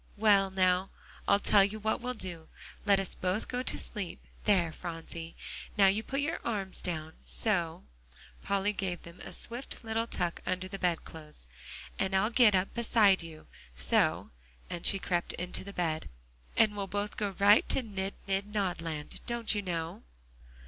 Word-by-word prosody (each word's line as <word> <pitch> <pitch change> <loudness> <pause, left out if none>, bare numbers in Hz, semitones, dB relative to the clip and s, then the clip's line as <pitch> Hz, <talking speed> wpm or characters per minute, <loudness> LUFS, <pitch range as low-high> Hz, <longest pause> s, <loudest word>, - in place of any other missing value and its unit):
Well, 200 -2 +5
now, 185 0 +2 0.4
I'll - - +6
tell 205 0 +5
you 205 +2 -1
what 220 +2 0
we'll 250 +1 -3
do. 175 -6 -4 0.4
Let 200 -1 +6
us 195 - 0
both 185 +4 -1
go 250 0 -2
to - - -2
sleep. 200 -6 -3 0.3
There, 180 -6 +4
Phronsie, 165 0 -7 0.4
now 200 - +7
you 195 +3 +4
put 275 +5 -2
your 320 +4 -1
arms 200 -5 -2
down, 160 -3 -3
so" 175 -7 0 0.6
Polly 200 +1 +1
gave 185 -4 -3
them 170 +1 -12
a - - -8
swift 240 +2 -4
little 225 +1 -1
tuck 175 -6 -2
under 185 0 -2
the 195 +1 -7
bed 175 -3 +1
clothes 150 - -11 0.5
"and 190 0 +1
I'll 210 +4 +3
get 230 -4 +6
up 185 +1 +1
beside 215 -5 +4
you, 160 -2 -10 0.3
so" - - +2 0.4
and 175 - 0
she 195 - +4
crept 175 -2 -1
on 180 +1 -4
to - - -1
the 200 - -7
bed 165 -5 -2 0.5
"and 215 -2 +5
we'll 200 -1 -3
both 205 +2 -2
go 200 -3 -2
right 205 +2 +6
to 265 - +1
'nid 195 -3 -4
nid 195 +1 -1
nodland,' 170 -7 -2
don't 235 -2 0
you 205 - 0
know?" 170 -3 -3
195 Hz, 175 wpm, -31 LUFS, 175-210 Hz, 0.6 s, now